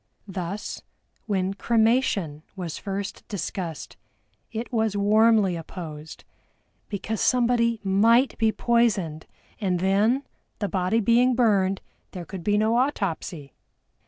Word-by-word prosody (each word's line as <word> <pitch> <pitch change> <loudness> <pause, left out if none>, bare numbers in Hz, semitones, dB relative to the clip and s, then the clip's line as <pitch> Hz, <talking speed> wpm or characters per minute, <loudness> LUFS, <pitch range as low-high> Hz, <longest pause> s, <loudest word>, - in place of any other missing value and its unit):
Thus, 190 +1 -5 0.5
when 190 -2 0
Cremation 220 - +1
was 175 -5 -5
first 200 0 -5
discussed, 180 -4 -5 0.5
it 230 +3 -5
was 220 -3 +1
warmly 210 -2 +4
opposed, 160 -2 -8 0.7
because 210 +1 -3
somebody 235 -2 +2
might 225 +7 +4
be 220 -1 +3
poisoned, 205 -11 +1 0.3
and 185 -5 0
then, 205 +8 +2 0.3
the 205 - -2
body 190 +4 +1
being 240 +4 +4
burned, 195 -5 +2 0.3
there 180 -2 -6
could 185 +1 -8
be 205 +2 +2
no 220 +2 +2
autopsy! 185 - -2
205 Hz, 110 wpm, -25 LUFS, 185-230 Hz, 0.7 s, warmly